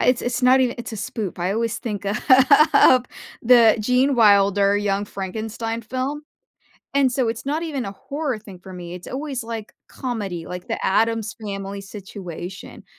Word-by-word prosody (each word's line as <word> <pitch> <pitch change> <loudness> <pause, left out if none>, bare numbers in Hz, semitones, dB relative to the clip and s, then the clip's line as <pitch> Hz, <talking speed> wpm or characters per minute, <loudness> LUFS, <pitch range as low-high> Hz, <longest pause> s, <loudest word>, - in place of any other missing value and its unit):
it's 250 -1 +2
it's 245 +1 -2
not 255 +1 +6
even 250 -2 +1
it's 235 -1 -6
a - - -5
spoop 215 -4 -5
I 180 +2 -1
always 230 +2 -1
think 205 -4 -5
of 200 +1 -1 1.3
the 235 -2 +6
Gene 250 +5 +2
Wilder 200 -2 +4
Young 205 0 0
Frankenstein 220 +4 -5
film, 260 +6 -3 0.7
and 275 -2 +3
so 245 -2 0
it's 225 +3 -5
not 305 +4 -1
even 280 -8 -3
a 195 - -6
horror 280 +3 -4
thing 200 -4 -13
for 190 0 -11
me, 175 -1 -8
it's 180 - -11
always 270 -2 -4
like 225 -2 -7
comedy, 205 -10 -5
like 180 0 -7
the - - -3
Addams 225 +1 +1
Family 200 -1 -5
situation, 190 -2 -9
220 Hz, 165 wpm, -22 LUFS, 195-250 Hz, 1.3 s, not